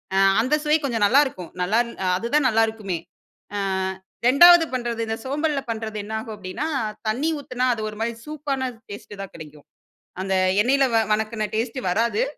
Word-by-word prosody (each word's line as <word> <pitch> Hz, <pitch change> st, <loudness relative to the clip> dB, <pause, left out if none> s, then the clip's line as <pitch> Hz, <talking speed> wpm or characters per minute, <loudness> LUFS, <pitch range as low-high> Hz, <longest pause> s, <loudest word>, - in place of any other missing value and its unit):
அ -, -, +2 dB, 0.2 s
அந்த 260 Hz, +6 st, +2 dB
சுவை 305 Hz, +1 st, +4 dB
கொஞ்சம் 225 Hz, -6 st, +1 dB
நல்லாருக்கும். 260 Hz, -, +2 dB
நல்லான் 230 Hz, +6 st, +1 dB, 0.3 s
அதுதான் 260 Hz, +7 st, +1 dB
நல்லா 225 Hz, 0 st, +3 dB
இருக்குமே 195 Hz, -6 st, -4 dB, 0.6 s
ஆ -, -, -1 dB, 0.7 s
2வது 345 Hz, +5 st, +8 dB
பண்றது 235 Hz, -2 st, -2 dB
இந்த 220 Hz, -, -1 dB
சோம்பல்ல 290 Hz, +2 st, -1 dB
பண்றது 220 Hz, -1 st, -4 dB
என்ன 215 Hz, -, -7 dB
ஆகும் 220 Hz, 0 st, -7 dB
அப்டின்னா, 195 Hz, +8 st, -5 dB, 0.4 s
தண்ணீ 250 Hz, +9 st, 0 dB
ஊத்துனா 255 Hz, -2 st, -2 dB
அது 220 Hz, -, -5 dB
ஒரு 210 Hz, -, -10 dB
மாரி 235 Hz, +1 st, -1 dB
சூப் 300 Hz, -1 st, -9 dB
ஆன 260 Hz, -1 st, -2 dB, 0.2 s
டேஸ்ட் 205 Hz, 0 st, -9 dB
தான் 195 Hz, -, -7 dB
கெடைக்கும். 150 Hz, -3 st, -12 dB, 0.6 s
அந்த 190 Hz, 0 st, -2 dB, 0.3 s
எண்ணெயில 270 Hz, +4 st, +3 dB
வ -, -, +4 dB, 0.2 s
வணக்குன 215 Hz, 0 st, -1 dB
டேஸ்ட் 230 Hz, +3 st, -2 dB
வராது. 235 Hz, -, +1 dB
230 Hz, 165 wpm, -23 LUFS, 215-275 Hz, 0.7 s, 2வது